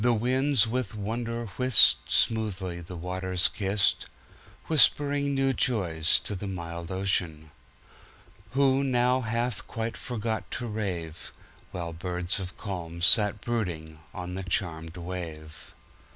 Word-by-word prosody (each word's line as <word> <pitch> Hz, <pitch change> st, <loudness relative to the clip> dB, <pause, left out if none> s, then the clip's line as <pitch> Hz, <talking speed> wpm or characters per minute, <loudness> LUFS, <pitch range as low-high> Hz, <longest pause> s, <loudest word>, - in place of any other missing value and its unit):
The 120 Hz, 0 st, +4 dB
winds 130 Hz, +2 st, +2 dB
with 120 Hz, 0 st, -2 dB
wonder 115 Hz, +3 st, -3 dB
whist, 120 Hz, 0 st, +6 dB
Smoothly 95 Hz, -6 st, 0 dB
the 90 Hz, +2 st, -9 dB
waters 90 Hz, +1 st, -1 dB
kist, 95 Hz, -2 st, 0 dB, 0.6 s
Whispering 145 Hz, -1 st, +3 dB
new 135 Hz, 0 st, +2 dB
joys 85 Hz, -11 st, +2 dB
to -, -, -2 dB
the 100 Hz, +1 st, -5 dB
mild 85 Hz, -2 st, -5 dB
Ocean, 90 Hz, -5 st, -1 dB, 1.0 s
Who 135 Hz, 0 st, +3 dB
now 125 Hz, -1 st, +2 dB
hath 120 Hz, +2 st, -2 dB
quite 115 Hz, 0 st, -3 dB
forgot 115 Hz, -2 st, -3 dB
to 120 Hz, -, -4 dB
rave, 90 Hz, -7 st, -4 dB, 0.4 s
While 85 Hz, -2 st, -4 dB
birds 90 Hz, +2 st, -2 dB
of 95 Hz, 0 st, -7 dB
calm 85 Hz, -5 st, -5 dB
sit 105 Hz, +2 st, +4 dB
brooding 85 Hz, -10 st, -3 dB
on 90 Hz, -1 st, -6 dB
the 95 Hz, -, -4 dB
charmed 85 Hz, -3 st, -2 dB
wave. 85 Hz, -3 st, -7 dB
95 Hz, 125 wpm, -28 LUFS, 85-120 Hz, 1.0 s, whist